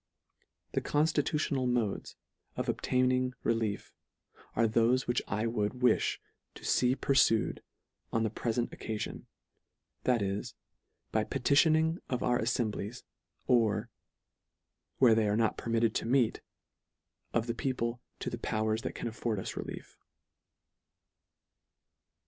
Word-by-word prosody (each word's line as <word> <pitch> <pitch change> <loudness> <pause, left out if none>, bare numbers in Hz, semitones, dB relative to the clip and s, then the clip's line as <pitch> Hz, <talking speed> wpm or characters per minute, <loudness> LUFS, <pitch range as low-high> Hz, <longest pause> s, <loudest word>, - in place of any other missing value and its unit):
The - - 0
constitutional 150 -3 +1
modes 120 -5 -1 0.4
of - - -3
obtaining 130 0 +1
re - - +3
lief, 110 -3 -3 0.6
are 115 0 +4
thofe 115 +4 +3
which 120 - +1
I 105 +3 -1
would 110 -2 0
wifli 125 -2 +2 0.4
to - - -11
fee 125 +1 +3
purfued 135 -6 +2 0.5
on 115 - +1
the 110 - 0
prefent 120 +1 -1
occafion, 110 -1 -5 0.8
that 120 -4 +3
is, 100 +1 -3 0.6
by 110 - +2
petitioning 155 +6 +3
of 125 -2 -1
our 120 0 +2
alfemblies, 115 -1 -2 0.4
or, 110 -1 +2 1.1
where 125 -4 +6
they 110 -1 +3
are 105 +1 +1
not 115 -2 +2
permitted 115 -1 +1
to - - -2
meet, 125 -2 +2 0.9
of 115 -1 +1
the 120 - -1
people 120 -1 -2 0.2
to - - -3
the 120 - -4
powers 110 -1 0
that - - -5
can - - -4
afford 115 -2 -2
us - - -5
relief. - - -7
115 Hz, 125 wpm, -31 LUFS, 110-125 Hz, 1.1 s, where